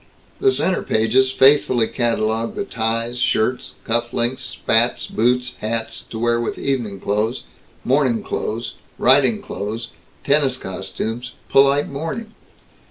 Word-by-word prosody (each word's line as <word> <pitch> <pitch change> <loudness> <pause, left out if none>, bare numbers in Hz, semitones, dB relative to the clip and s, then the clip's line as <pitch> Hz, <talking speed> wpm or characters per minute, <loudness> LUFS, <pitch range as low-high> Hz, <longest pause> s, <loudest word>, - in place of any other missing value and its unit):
The 400 - +4
center 190 - +1
pages 115 +4 +2
faithfully 130 -4 +4
catalogued 115 -2 -1
the 200 - -2
ties, 115 - -2
shirts, 125 +1 0
cuff 120 0 -1
links, 125 +3 -1
spats, 120 -2 +1
boots, 125 +2 0
hats, 115 +1 -3
to 115 - -6
wear 120 +1 +1
with 120 - -3
evening 120 -8 -2
clothes, 110 +6 -1 0.4
morning 130 -3 +2
clothes, 115 +2 -3 0.2
riding 145 - +4
clothes, 115 - -5 0.3
tennis 140 -2 +2
costumes, 110 +5 -5 0.2
polite 140 +1 +4
mourning. 165 +11 -5
120 Hz, 120 wpm, -20 LUFS, 115-135 Hz, 0.4 s, The